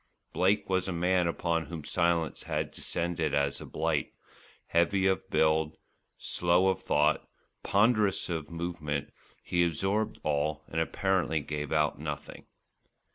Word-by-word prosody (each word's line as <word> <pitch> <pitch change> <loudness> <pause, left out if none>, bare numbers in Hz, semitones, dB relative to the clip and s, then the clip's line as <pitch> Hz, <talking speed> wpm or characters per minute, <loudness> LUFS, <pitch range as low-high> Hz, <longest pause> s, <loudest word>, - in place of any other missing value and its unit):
Blake 100 +3 +2
was 95 -1 0
a - - -1
man 90 +1 +2
upon 85 -1 -1
whom 80 -2 -6
silence 85 0 0
had - - -1
descended 85 -2 -2
as 70 0 0
a - - -8
blight; - - -1 0.5
heavy 95 +3 +2
of 95 -3 +1
build, 80 0 +2 0.4
slow 90 +2 +2
of 95 - -1
thought, 75 +1 +2 0.3
ponderous 105 -1 +2
of 80 -4 -3
movement, 80 -4 -3 0.3
he 85 0 +2
absorbed 95 +6 0
all 75 +1 0
and 80 - 0
apparently 90 -2 +1
gave 75 0 -4
out 75 -2 +1
nothing. 75 -1 -6
85 Hz, 130 wpm, -30 LUFS, 75-95 Hz, 0.5 s, Blake